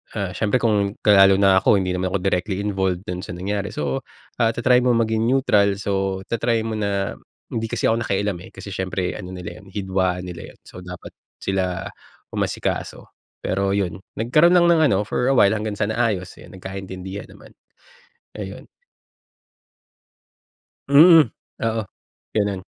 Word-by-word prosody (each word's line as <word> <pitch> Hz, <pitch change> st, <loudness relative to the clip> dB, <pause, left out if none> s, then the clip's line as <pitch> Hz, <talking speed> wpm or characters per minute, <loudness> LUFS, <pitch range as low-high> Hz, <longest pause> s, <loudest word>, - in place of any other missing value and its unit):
ah, 100 Hz, -4 st, -2 dB
siyempre 110 Hz, +4 st, +1 dB
kung, 105 Hz, -3 st, +1 dB
lalo 95 Hz, -2 st, +7 dB
na 95 Hz, -1 st, +5 dB
ako -, -, +4 dB
hindi 95 Hz, -2 st, 0 dB
naman 90 Hz, +1 st, -1 dB
ako -, -, +4 dB
directly 95 Hz, +1 st, -1 dB
involved 95 Hz, -3 st, -1 dB
do'n 90 Hz, -2 st, -5 dB
sa 90 Hz, -, -7 dB
nangyari, 100 Hz, +3 st, -3 dB
so, 70 Hz, -2 st, -1 dB, 0.4 s
ah, 115 Hz, -1 st, +2 dB
ta-try 125 Hz, +1 st, +4 dB
mo 125 Hz, -1 st, +2 dB
maging 110 Hz, 0 st, +1 dB
neutral, 105 Hz, -6 st, +3 dB
so 95 Hz, -1 st, -2 dB
ta-try 115 Hz, 0 st, +1 dB
mo 110 Hz, -1 st, -3 dB
na 100 Hz, -1 st, -2 dB, 0.3 s
hindi 115 Hz, 0 st, -2 dB
kasi -, -, -4 dB
ako 115 Hz, -, +1 dB
nakialam, 100 Hz, -4 st, -1 dB
eh, -, -, -14 dB
kasi 100 Hz, -, -8 dB
siyempre 90 Hz, -1 st, -2 dB
ano 90 Hz, -, -7 dB
nila 90 Hz, +3 st, -8 dB
yon, 100 Hz, -, -17 dB
hidwaan 95 Hz, -2 st, -1 dB
nila 90 Hz, -2 st, -9 dB
yon, -, -, -33 dB
so -, -, -12 dB
dapat, 90 Hz, 0 st, -9 dB, 0.3 s
sila 95 Hz, -2 st, -2 dB, 0.4 s
umasikaso, -, -, -2 dB, 0.4 s
pero 100 Hz, +1 st, 0 dB
'yon. 100 Hz, -3 st, -1 dB, 0.2 s
Nagkaro'n 150 Hz, +10 st, +3 dB
lang 175 Hz, -1 st, +5 dB
ng 165 Hz, -2 st, +4 dB
ano 95 Hz, -, +2 dB
for 125 Hz, +4 st, -1 dB
a 135 Hz, -, +3 dB
while, 100 Hz, -6 st, +5 dB
hanggang 110 Hz, 0 st, -2 dB
sa 105 Hz, 0 st, -1 dB
naayos. 110 Hz, -6 st, -1 dB
Eh, -, -, -13 dB
nagkaintindihan 95 Hz, +1 st, -7 dB
naman, -, -, -16 dB, 0.9 s
ayun. -, -, -7 dB, 2.2 s
Mm. 155 Hz, -1 st, +7 dB, 0.3 s
Oo, 115 Hz, 0 st, 0 dB, 0.5 s
gano'n. 100 Hz, -3 st, 0 dB
100 Hz, 160 wpm, -22 LUFS, 95-110 Hz, 2.2 s, lalo